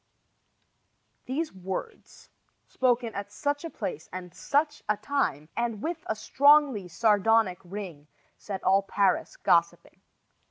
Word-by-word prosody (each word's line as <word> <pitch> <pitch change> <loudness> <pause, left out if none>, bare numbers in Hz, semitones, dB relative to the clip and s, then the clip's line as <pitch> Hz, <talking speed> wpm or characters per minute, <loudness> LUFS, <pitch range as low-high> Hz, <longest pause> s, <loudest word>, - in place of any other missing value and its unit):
These 305 +5 -3
words, 190 - -7 0.3
spoken 245 -3 0
at 200 0 -6
such 290 +6 -2
a 330 - -4
place 445 +7 -6
and 180 -1 -7
such 295 - 0
a 210 - +2
time, 205 - -1
and 235 -3 -2
with 330 0 -3
a 220 - -1
strongly 280 -4 +4
sardonic 210 0 +2
ring, 175 -6 -8 0.3
set 195 -2 -7
all 195 +1 +4
Paris 200 - 0
gossiping. - - +1
220 Hz, 120 wpm, -27 LUFS, 190-285 Hz, 0.3 s, strongly